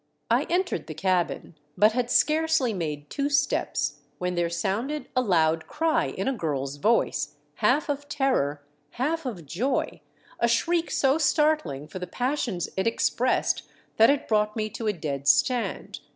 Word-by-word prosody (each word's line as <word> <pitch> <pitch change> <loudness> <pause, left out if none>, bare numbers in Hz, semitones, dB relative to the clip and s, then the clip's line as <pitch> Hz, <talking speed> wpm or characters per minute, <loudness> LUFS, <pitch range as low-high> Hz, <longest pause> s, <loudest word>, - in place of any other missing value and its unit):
I - - +3
entered 360 - 0
the 155 - -7
cabin, 180 +1 -1 0.2
but 210 +3 +5
had 245 +1 -1
scarcely 310 -6 +2
made 150 -5 -4
two 280 0 -1
steps 150 - 0 0.2
when 180 0 -2
there 175 -1 0
sounded 215 - -2
a 255 - +4
loud 165 -7 +2
cry 325 +1 +1
in 195 - -4
a 270 - +2
girl's 145 - -3
voice, 225 +10 +1 0.2
half 300 - +2
of 290 0 -3
terror, 150 - 0 0.3
half 300 +4 -1
of 185 -10 -6
joy; 235 - -2 0.4
a 235 - +3
shriek 335 +9 +1
so 275 +3 +2
startling 300 - +1
for 185 - -7
the 180 - -5
passions 245 - -2
it 190 +3 0
ex 230 - +1
pressed 255 +2 +1 0.4
that 225 +1 +7
it 280 0 +1
brought 210 -1 +1
me 215 -1 -2
to 225 - -4
a - - +4
dead 140 -5 -4
stand. 240 - +1
220 Hz, 165 wpm, -26 LUFS, 170-280 Hz, 0.4 s, that